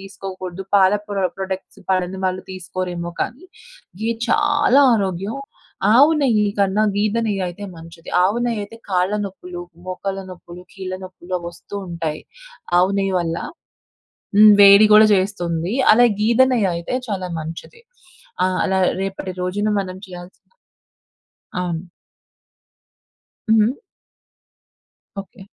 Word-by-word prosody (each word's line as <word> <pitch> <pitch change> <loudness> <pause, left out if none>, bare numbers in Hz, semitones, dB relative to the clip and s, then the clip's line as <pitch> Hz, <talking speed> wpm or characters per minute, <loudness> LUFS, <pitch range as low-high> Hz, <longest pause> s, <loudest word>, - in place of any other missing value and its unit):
తీసుకోకూడదు. 190 -1 -7
పాల 190 -1 +5
ప్రొ 200 -2 -2
ప్రొడక్ట్స్ 190 0 -6
పడని 185 0 0
వాళ్ళు 185 0 -1
తీసుకోరేమో 180 -1 -5
కానీ, 260 - -4 0.6
ఘీ 225 +1 0 0.2
చాలా 290 -2 +3
ఆరోగ్యం. 195 +2 -2 0.6
ఆవు 280 +6 +7
నెయ్యి 225 -7 +2
కన్నా 200 +1 +2
గేద 210 +2 0
నెయ్యి 200 -3 -1
అయితే 175 +4 -8
మంచిది. 165 0 -12
ఆవు 200 +6 +2
నెయ్యి 230 -3 -1
అయితే 205 +3 -10
కాళ్ళ 185 +1 +1
నొప్పులు, 180 -2 -8 0.3
మోకాళ్ళ 195 +1 -4
నొప్పులు, 175 0 -11
కీళ్ళ 190 -1 -6
నొప్పులు 185 -1 -12
అవొస్తూ 170 +3 -10
ఉంటాయి. 165 -3 -4 0.6
ఆవు 185 +2 +3
నెయ్యి 195 -1 0
వల్ల. 165 -1 -2 1.0
హ్మ్. 215 0 +9
వేడి 200 +1 +9
గూడా 215 0 +8
చేస్తుంది. 180 -2 -2 0.2
అలా 245 +2 +6 0.2
గేద 230 +3 +3
నెయ్యి 215 -6 +2
అయితే, 170 +8 -3
చాలా 190 -4 -3
మంచిది. 165 - -9 0.6
ఆహ్, 185 0 -1
అలా 190 -1 +1 0.2
రేపటి 190 -1 -4
రోజున 200 +4 -1
మనం 185 -1 -5
చేయాల్సిన 180 0 -12 1.2
అవును. 170 -2 -3 1.7
హ్మ్. 220 0 +4 1.5
ఓకె. 195 +1 -9
190 Hz, 120 wpm, -20 LUFS, 180-210 Hz, 1.7 s, హ్మ్